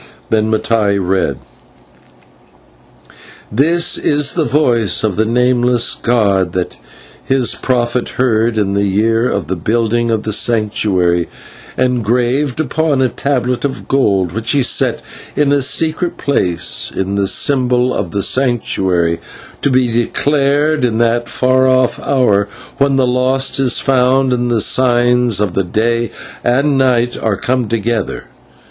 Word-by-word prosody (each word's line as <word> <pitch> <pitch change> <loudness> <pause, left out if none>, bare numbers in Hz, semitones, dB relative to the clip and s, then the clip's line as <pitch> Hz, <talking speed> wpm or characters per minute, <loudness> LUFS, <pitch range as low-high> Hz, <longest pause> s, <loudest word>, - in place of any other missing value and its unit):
Then 110 -1 +1
Mattai 110 -2 0
read: 95 0 -1 2.1
"This 160 +9 +1
is 145 -1 0
the 165 -3 0
voice 120 - +1
of 105 -4 0
the 110 - +1
Nameless 125 +1 +1
god 100 -6 0
that 90 -1 -3 0.5
his 130 -2 +1
prophet 120 -1 -1
heard 115 -2 +1
in 100 -2 0
the 100 0 0
year 115 +5 +1
of 100 -5 -2
the 95 +5 -3
building 115 +5 -1
of 110 -2 -1
the 110 - -3
Sanctuary, 100 -6 +1 0.5
and 125 -2 0
graved 125 +5 0
upon 155 -1 0
a 130 -1 +2
tablet 125 -3 -2
of 140 -1 -4
gold 100 -10 +1
which 115 +4 -2
he 140 -2 +2
set - - +1 0.3
in 145 -1 +1
a 145 -1 +2
secret 160 +5 0
place 90 -12 0
in 95 +1 -3
the 100 -1 0
symbol 125 +1 +2
of 90 - -3
the 100 +3 -2
Sanctuary, 95 -10 0 0.4
to - - +1
be 130 -1 +2
declared 140 +5 0
in 115 -3 0
that 120 0 0
far 130 0 +1
off 130 -1 +1
hour 105 -7 +1 0.3
when 140 0 +2
the 135 -1 +2
lost 130 +2 +1
is 130 -3 +2
found 130 -1 +2
and 120 0 -1
the 115 -2 +1
signs 120 -2 +2
of 105 -4 -1
the 95 - 0
Day 115 +5 -1 0.3
and 125 +4 +1
the 135 -1 +2
Night 120 -1 0
are 110 -3 -1
come 125 +1 -1
together. 115 -1 -2
120 Hz, 145 wpm, -14 LUFS, 105-130 Hz, 2.1 s, a